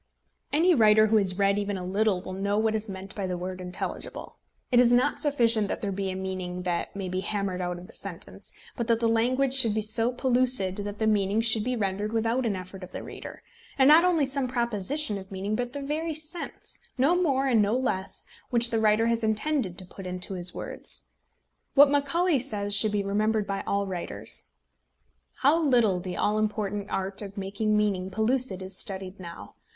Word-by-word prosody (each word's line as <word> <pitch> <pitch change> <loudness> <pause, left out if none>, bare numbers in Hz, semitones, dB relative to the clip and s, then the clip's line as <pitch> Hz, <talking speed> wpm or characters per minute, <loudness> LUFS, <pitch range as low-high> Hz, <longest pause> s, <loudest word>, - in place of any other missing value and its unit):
Any 335 +5 +4
writer 215 -5 +5
who 220 0 +3
has 190 -3 +4
read 200 0 +2
even 205 -1 -2
a 180 - -5
little 195 0 0
will 185 - -6
know 200 +2 -1
what 220 0 +1
is 220 0 -2
meant 190 +1 -7
by 195 -2 -3
the 180 -1 -3
word 185 +1 -5
intelligible. 180 0 -6 0.3
It 245 - +5
is 245 -1 +5
not 250 +4 +2
sufficient 235 -8 +2
that - - -4
there 200 - -1
be 195 0 -2
a 185 - -4
meaning 185 -1 -4
that 175 0 -2
may 195 -2 -4
be 185 +1 -2
hammered 195 -2 -2
out 175 0 -3
of 175 - -10
the - - -13
sentence, - - -5 0.2
but 235 -3 -3
that 230 -1 +2
the 230 - +1
language 250 +4 +2
should 230 -6 +5
be 215 - 0
so 225 +3 +2
pellucid 250 -6 +2
that 205 0 -5
the 220 - -1
meaning 205 -1 +2
should 225 -1 +3
be 250 +2 -1
rendered 205 0 -2
without 230 +2 0
an 205 - 0
effort 185 +1 -8
of 185 - -10
the - - -6
reader; - - -9 0.3
and 265 -1 +5
not 310 +3 +8
only 340 -5 +3
some 270 -1 +1
proposition 235 0 -1
of 190 0 -12
meaning, 195 +2 -2
but 245 +1 -3
the 285 -1 -5
very 310 +3 -2
sense, 315 +3 -6 0.2
no 280 +7 +3
more 280 -7 +1
and 240 -5 +3
no 210 +3 +1
less, 195 -7 -2 0.2
which 235 -1 +4
the 225 - +1
writer 215 +1 +3
has 230 0 0
intended 220 - 0
to 185 - -8
put 185 +1 -10
into 180 +1 -5
his 180 -1 -3
words. - - -2 0.7
What 285 0 +7
Macaulay 290 +3 +2
says 205 -5 -1
should 210 +1 +4
be 205 -1 0
remembered 210 +2 0
by 195 -1 -3
all 200 0 0
writers: 185 -3 -2 0.9
"How 305 +5 +5
little 235 -10 +3
the 180 0 -6
all 210 +1 +1
important 210 -1 -2
art 195 +1 -3
of 200 -1 -8
making 200 +2 -1
meaning 195 -3 0
pellucid 220 -2 0
is 190 0 -8
studied 190 -2 -5
now! 170 -2 -9
215 Hz, 205 wpm, -27 LUFS, 190-245 Hz, 0.9 s, not